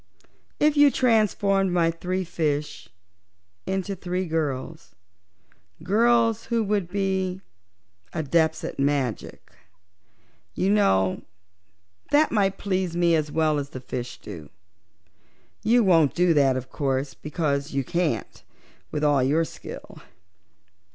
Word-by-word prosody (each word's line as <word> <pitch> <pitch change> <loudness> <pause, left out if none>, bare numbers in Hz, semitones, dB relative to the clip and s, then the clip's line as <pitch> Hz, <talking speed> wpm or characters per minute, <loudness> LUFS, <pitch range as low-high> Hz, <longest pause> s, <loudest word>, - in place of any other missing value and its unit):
If 300 0 +3
you 290 0 +7
transformed 205 -6 +2
my 170 -2 +2
three 180 +3 -3
fish 150 - -3 0.8
into 190 +1 -2
three 180 +1 -3
girls 160 -1 -4 0.9
girls 230 +3 +2
who 230 -1 0
would 200 -4 -1
be 190 -1 -1 0.7
Adepts 160 +1 0
at 165 - -6
Magic, 140 -4 -2 1.0
you 195 - +1
know 95 - +2 0.9
they 295 +2 +5
might 200 -3 +1
please 185 -3 -2
me 170 -1 +3
as 155 -2 -1
well 155 -2 +1
as 140 0 -5
the 130 - -8
fish 125 -1 -6
do. 80 -8 -10 1.1
You 235 +2 +3
won't 165 -7 +4
do 180 -1 +3
that 135 -3 +3
of 130 0 -7
course, 135 -1 -2
because 150 -2 -2
you 135 0 0
can't, 175 +1 -2 0.5
with 150 - -3
all 145 -2 +3
your 150 +6 +2
skill. - - -10
170 Hz, 115 wpm, -24 LUFS, 145-195 Hz, 1.1 s, you